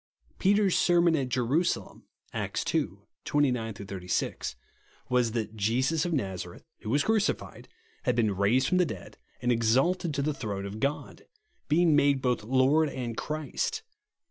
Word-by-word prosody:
Peter's 200 Hz, -1 st, +3 dB
sermon 175 Hz, -1 st, +4 dB
at 135 Hz, -4 st, -1 dB
Jerusalem 130 Hz, +8 st, -1 dB, 0.3 s
(Acts -, -, -2 dB
ii. -, -, +2 dB, 0.4 s
29 125 Hz, -7 st, 0 dB
36) 95 Hz, -3 st, -3 dB, 0.5 s
was 125 Hz, -3 st, +2 dB
that 110 Hz, -2 st, -3 dB
Jesus 130 Hz, -, +1 dB
of 175 Hz, -, -1 dB
Nazareth, 95 Hz, -, -4 dB, 0.2 s
who 105 Hz, -, -7 dB
v/as 140 Hz, +4 st, +2 dB
crucified, 220 Hz, -2 st, -1 dB, 0.4 s
had 125 Hz, -, +2 dB
been 110 Hz, -4 st, +1 dB
raised 115 Hz, +8 st, +2 dB
from 180 Hz, -, +2 dB
the 180 Hz, -, +4 dB
dead -, -, -8 dB, 0.2 s
and 120 Hz, -, +2 dB
exalted 135 Hz, +10 st, +2 dB
to 140 Hz, -, 0 dB
the 150 Hz, +1 st, 0 dB
throne 100 Hz, -6 st, -4 dB
of 100 Hz, +2 st, -6 dB
God, 140 Hz, +5 st, -3 dB, 0.4 s
being 160 Hz, +1 st, +4 dB
made 140 Hz, -1 st, +4 dB
both 125 Hz, -4 st, 0 dB
Lord 135 Hz, +6 st, +3 dB
and 120 Hz, -4 st, -4 dB
Christ. 155 Hz, -, -3 dB
130 Hz, 145 wpm, -28 LUFS, 110-155 Hz, 0.5 s, sermon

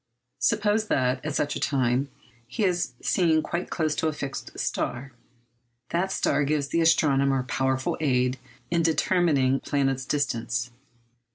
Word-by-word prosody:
Suppose 210 Hz, -, +1 dB
that, 130 Hz, -5 st, +1 dB
at 150 Hz, -1 st, -3 dB
such 145 Hz, -, 0 dB
a -, -, -3 dB
time, 130 Hz, 0 st, +1 dB, 0.4 s
he 210 Hz, -, -3 dB
is 175 Hz, -8 st, 0 dB
seen 160 Hz, -4 st, +2 dB
quite 170 Hz, +1 st, -3 dB
close 155 Hz, -3 st, 0 dB
to 160 Hz, -, +1 dB
a 155 Hz, -, -1 dB
fixed 140 Hz, -2 st, -6 dB
star. 130 Hz, +3 st, -3 dB, 0.8 s
That 185 Hz, +3 st, 0 dB
star 145 Hz, -, +1 dB
gives 145 Hz, -1 st, 0 dB
the 165 Hz, -, +1 dB
astronomer 140 Hz, -5 st, +3 dB
powerful 130 Hz, +1 st, -1 dB
aid 125 Hz, -3 st, +1 dB, 0.3 s
in 170 Hz, -1 st, +2 dB
determining 160 Hz, -4 st, +2 dB
the -, -, -13 dB
planet's 135 Hz, -2 st, 0 dB
distance. 120 Hz, -4 st, -1 dB
140 Hz, 145 wpm, -26 LUFS, 130-165 Hz, 0.8 s, astronomer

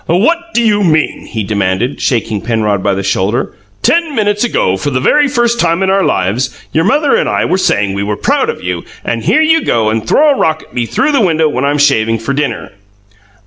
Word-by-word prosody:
"What 335 Hz, -, 0 dB
do 235 Hz, -, +3 dB
you 210 Hz, -2 st, +2 dB
mean?" 155 Hz, -3 st, 0 dB
he 110 Hz, -2 st, -4 dB
demanded, 100 Hz, +4 st, -1 dB
shaking 110 Hz, -4 st, -1 dB
Penrod 110 Hz, -4 st, -1 dB
by 100 Hz, 0 st, 0 dB
the 100 Hz, -, -3 dB
shoulder. 100 Hz, +6 st, -1 dB, 0.3 s
"Ten 335 Hz, -4 st, +1 dB
minutes 205 Hz, -1 st, 0 dB
ago, 95 Hz, -, 0 dB
for 95 Hz, -, -3 dB
the 130 Hz, -2 st, -1 dB
very 290 Hz, -, +3 dB
first 240 Hz, -3 st, 0 dB
time 170 Hz, +2 st, +1 dB
in 190 Hz, -, +1 dB
our 195 Hz, 0 st, +2 dB
lives, 110 Hz, -, 0 dB, 0.2 s
your 160 Hz, +2 st, +1 dB
mother 290 Hz, -, +2 dB
and -, -, 0 dB
I -, -, 0 dB
were 190 Hz, -, 0 dB
saying 100 Hz, -, +1 dB
we 100 Hz, -, -3 dB
were 105 Hz, 0 st, -2 dB
proud 290 Hz, -, 0 dB
of 465 Hz, -, -5 dB
you, -, -, -3 dB, 0.2 s
and -, -, -2 dB
here 315 Hz, -, +3 dB
you 320 Hz, +1 st, +3 dB
go 110 Hz, -2 st, +1 dB
and 110 Hz, 0 st, -2 dB
throw 300 Hz, +1 st, +4 dB
a 275 Hz, -, 0 dB
rock 160 Hz, 0 st, 0 dB
at -, -, -22 dB
me 120 Hz, -1 st, -2 dB
through 300 Hz, -, 0 dB
the 280 Hz, -, +2 dB
window 160 Hz, -5 st, +2 dB
when 135 Hz, -2 st, -1 dB
I'm 145 Hz, +1 st, +1 dB
shaving 115 Hz, -6 st, +2 dB
for 115 Hz, +5 st, -3 dB
dinner!" 140 Hz, -5 st, -3 dB
150 Hz, 225 wpm, -13 LUFS, -, 0.3 s, throw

